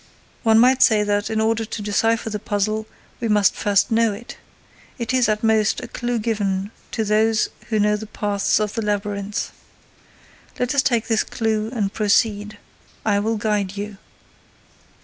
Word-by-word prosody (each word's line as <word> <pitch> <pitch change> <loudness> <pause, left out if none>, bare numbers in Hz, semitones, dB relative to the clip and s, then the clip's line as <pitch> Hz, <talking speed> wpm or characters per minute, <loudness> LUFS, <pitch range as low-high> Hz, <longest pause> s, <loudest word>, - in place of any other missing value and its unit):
One 220 -1 +4
might 255 +3 +5
say 215 -3 +5
that, 205 0 0
in 220 -1 -1
order 225 +1 +1
to 220 0 -6
decipher 225 +2 +1
the 210 - -3
puzzle, 215 +2 -1 0.3
we 235 - -2
must 210 -2 +3
first 205 -1 +1
know 225 -1 +3
it. 230 +4 -9 0.6
It 235 0 -3
is, 255 -3 +3
at 215 +1 0
most, 220 -1 +2
a - - -7
clue 240 0 -2
given 205 -3 -1 0.2
to 220 -2 -1
those 215 +1 +2 0.2
who 220 - +1
know 210 0 +3
the 215 +1 -6
paths 205 -1 0
of 210 -1 -1
the 225 - -2
labyrinth. 205 -1 -2 1.1
Let 250 +2 0
us 280 - +4
take 235 -5 +1
this 225 -3 +2
clue 220 -2 -1
and 210 -5 -2
proceed. 210 0 +1 0.5
I 205 -2 +2
will 220 +2 0
guide 205 -3 -1
you. 205 0 -5
215 Hz, 170 wpm, -21 LUFS, 205-225 Hz, 1.1 s, might